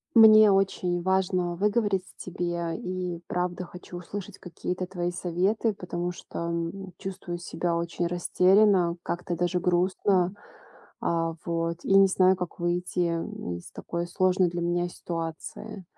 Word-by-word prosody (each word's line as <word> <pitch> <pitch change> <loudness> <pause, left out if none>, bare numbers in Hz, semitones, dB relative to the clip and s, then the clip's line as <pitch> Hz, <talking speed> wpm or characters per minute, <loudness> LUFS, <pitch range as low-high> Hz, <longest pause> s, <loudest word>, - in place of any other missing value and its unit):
Мне 215 -2 +9
очень 185 -2 +1
важно 185 -1 +1
выговорить 205 -1 +1
тебе 175 -2 -3
и 180 -1 -4
правда 180 0 -2
хочу 180 0 -10
услышать 185 +2 -7
какие-то 180 +1 -4
твои 175 -1 -2
советы, 185 +6 0
потому 180 -2 -4
что, - - -9
м, 170 +3 -4
чувствую 185 -3 -5
себя 175 0 -2
очень 170 +1 -2
растерянно, 180 +1 +4
как-то 175 0 -3
даже 175 +1 0
грустно. 180 +1 +2 0.7
А, 165 -1 0
вот 165 0 -1
и 195 - +4
не 195 0 +7
знаю, 185 0 +4
как 180 -1 -6
выйти, 175 0 0
м, 165 - -3
из 85 - -12
такой 170 0 -4
сложной 185 +1 +2
для 175 0 -3
меня 175 +1 0
ситуации. 170 +5 -6
180 Hz, 135 wpm, -27 LUFS, 175-190 Hz, 0.7 s, Мне